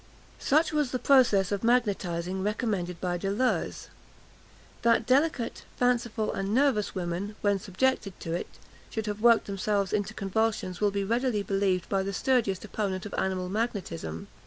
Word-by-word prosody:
Such 310 +3 +2
was 300 -4 +1
the 255 - -1
process 240 -9 +4
of 200 0 -2
magnetising 190 -6 0
recommended 200 -4 -2
by 175 -1 -2
Deleuze. 205 +7 -1 0.9
That 230 -1 +3
delicate, 265 -1 +1
fanciful, 235 -3 +1
and 195 +2 -2
nervous 260 -8 +2
women, 185 +3 -3
when 205 -1 +2
subjected 200 +1 -1
to 165 - -3
it, 175 - -2 0.4
should 220 -1 -3
have 210 0 -4
worked 235 -1 +5
themselves 200 0 -1
into 210 +1 -1
convulsions 195 -2 -1
will 205 - +4
be 200 0 -2
readily 230 0 0
believed 195 -3 0
by 195 -1 +1
the 195 +1 -3
sturdiest 215 -3 +1
opponent 200 -3 -3
of 210 - -7
animal 185 -1 -1
magnetism. 185 - -3
205 Hz, 150 wpm, -28 LUFS, 190-235 Hz, 0.9 s, worked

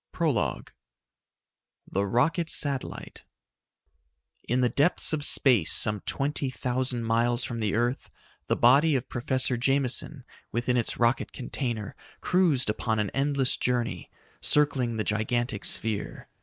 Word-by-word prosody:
_ - - -61
PROLOGUE - - -1 1.2
The 100 +1 0
Rocket 160 - +1
Satellite 140 -4 -1 1.2
In 125 +2 +1
the 125 - +3
depths 145 +6 +2
of 150 -2 -1
space, 120 - +3
some 105 -1 0
twenty 140 -1 -1
thousand 125 -1 -2
miles 120 +2 +1
from 120 -1 -4
the 105 -2 -1
earth, 120 +4 -1 0.4
the - - +1
body 140 +6 +4
of 130 0 -3
Professor 130 0 0
Jameson 135 +2 -1 0.3
within 120 +1 0
its 120 -2 -1
rocket 120 +2 +1
container 120 -5 -4 0.2
cruised 170 -8 +2
upon 110 +1 -1
an 105 -2 -1
endless 135 -1 +1
journey, 120 -2 -2 0.3
circling 130 -6 +1
the 110 - 0
gigantic 110 +1 -2
sphere. 110 -2 -2
125 Hz, 130 wpm, -27 LUFS, 115-135 Hz, 1.2 s, body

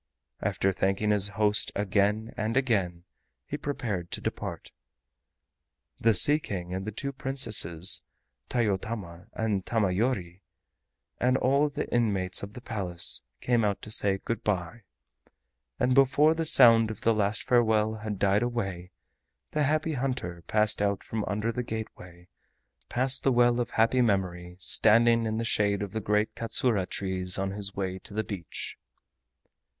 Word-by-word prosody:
After 95 - 0
thanking 95 +3 0
his 105 -1 +2
kind 105 - -13
host 105 -1 +1
again 105 +2 0
and 110 +3 -2
again, 95 -10 0 0.4
he - - -5
prepared 110 -12 -4
to - - -3
depart. - - -5 1.3
The 115 -1 +3
Sea 145 +10 +5
King 90 - -6
and 95 +1 -4
the - - -2
two 140 +6 -4
Princesses, 110 -11 +2 0.5
Tayotama 100 -5 -3
and 105 -4 -1
Tamayori, 95 -3 -1 0.8
and 125 +1 +2
all 140 +4 +2
the 145 +1 -4
inmates 100 -6 +1
of 100 +1 -8
the 125 - -10
Palace, 95 -8 -1 0.2
came 120 -2 +1
out 100 -2 -1
to 110 - -7
say 100 -2 +2
"Good 115 +4 -4
by," 100 +2 -2 1.0
and 125 +1 +2
before 140 +4 +4
the 165 0 -2
sound 115 -6 +7
of 110 - -7
the 115 - +3
last 105 -1 0
farewell 110 -3 +2
had 105 -1 -5
died 100 +2 +2
away 95 -7 -3 0.6
the 150 - -1
Happy 155 +2 +1
Hunter 125 -10 -3
passed 105 -1 +2
out 100 -1 0
from 110 -1 -4
under 105 +3 -2
the 125 - -3
gateway, 90 -6 -8 0.6
past 130 +2 +2
the 135 - +2
well 120 0 +3
of 120 - -1
happy 115 +3 +2
memory 90 -5 -1
standing 115 +4 +3
in 110 0 -2
the 115 - -1
shade 100 -2 +1
of 100 - -6
the 110 - -3
great 105 +2 0
KATSURA 115 -4 0
trees 95 -2 -1
on 95 0 -2
his 100 0 -6
way 95 -1 -3
to 100 - -7
the 110 - 0
beach. 95 -6 -7
105 Hz, 155 wpm, -28 LUFS, 95-120 Hz, 1.3 s, sound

